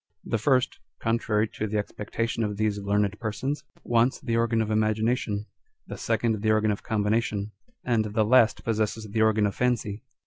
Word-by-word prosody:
The 115 - -1
first, 130 +2 +2 0.2
contrary 115 -1 +1
to 110 - -4
the 105 +1 -1
expectation 115 +2 -2
of 105 -2 -2
these 105 -1 0
learned 100 +1 0
persons, 130 +6 -3 0.2
wants 120 +2 +2
the 115 - -2
organ 115 0 +2
of 110 -1 0
imagination; 110 0 0 0.4
the - - -7
second 110 -3 0
the 110 - +1
organ 110 0 +3
of 100 - -3
combination; 105 -1 0 0.3
and 115 -3 +2
the 105 +1 +1
last 115 0 +4
possesses 110 0 -1
the 110 +2 -1
organ 110 -1 +4
of 100 - 0
fancy. 115 -4 -1
110 Hz, 170 wpm, -26 LUFS, 105-115 Hz, 0.4 s, last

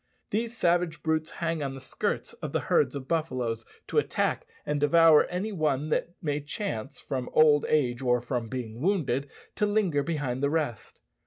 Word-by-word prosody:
These 230 +2 -1
savage 175 -4 +1
brutes 160 -1 0
hang 165 -2 -2
on 135 -1 -3
the - - -7
skirts 130 - -3
of - - -7
the - - +2
herds - - +2
of 135 -2 -6
buffaloes 125 -9 -1 0.2
to - - +2
attack - - -1 0.2
and 150 0 0
devour 160 +1 +6
any 185 +5 -3
one 155 -5 0
that 170 +2 -1
may 145 -2 0
chance, 145 - -4
from 130 -2 -4
old 150 -2 +5
age 125 -4 +2
or 125 -1 +3
from 120 -1 -3
being 120 -2 -5
wounded, 145 -7 0 0.3
to 210 - +2
linger 200 -9 +2
behind 140 -5 -2
the 140 - +2
rest. 145 -8 -3
150 Hz, 175 wpm, -28 LUFS, 130-165 Hz, 0.3 s, devour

